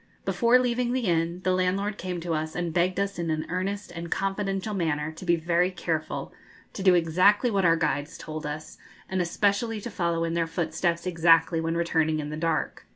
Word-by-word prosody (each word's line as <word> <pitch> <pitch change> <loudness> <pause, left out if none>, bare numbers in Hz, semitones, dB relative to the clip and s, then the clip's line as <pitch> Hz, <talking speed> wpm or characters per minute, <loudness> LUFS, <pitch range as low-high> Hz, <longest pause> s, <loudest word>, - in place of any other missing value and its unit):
Before 235 +1 +4
leaving 245 -1 0
the 260 - 0
inn 170 0 0
the 185 - +2
landlord 195 +3 0
came 180 -1 -3
to 170 0 -2
us 155 0 -3
and 175 -2 -2
begged 180 +2 +1
us 200 -2 -2
in 170 -1 -2
an 155 0 -1
earnest 190 +2 -3
and 170 0 -6
confidential 195 +2 -2
manner 160 -5 -1
to 165 +3 -10
be 170 -1 +4
very 170 +2 +1
careful, 165 -4 -3 0.4
to - - -6
do 185 -1 +5
exactly 185 +8 +3
what 195 -3 +1
our 165 -1 +5
guides 150 -2 -1
told 155 0 -6
us, 150 +1 -7 0.3
and 190 -1 -1
especially 205 +5 0
to 235 +3 -7
follow 170 -3 0
in 165 0 -1
their 170 -1 0
footsteps 170 +1 -1
exactly 165 -1 +4
when 165 +1 -1
returning 160 -2 +1
in 150 0 -4
the - - -3
dark. 160 0 -2
175 Hz, 200 wpm, -26 LUFS, 165-195 Hz, 0.4 s, do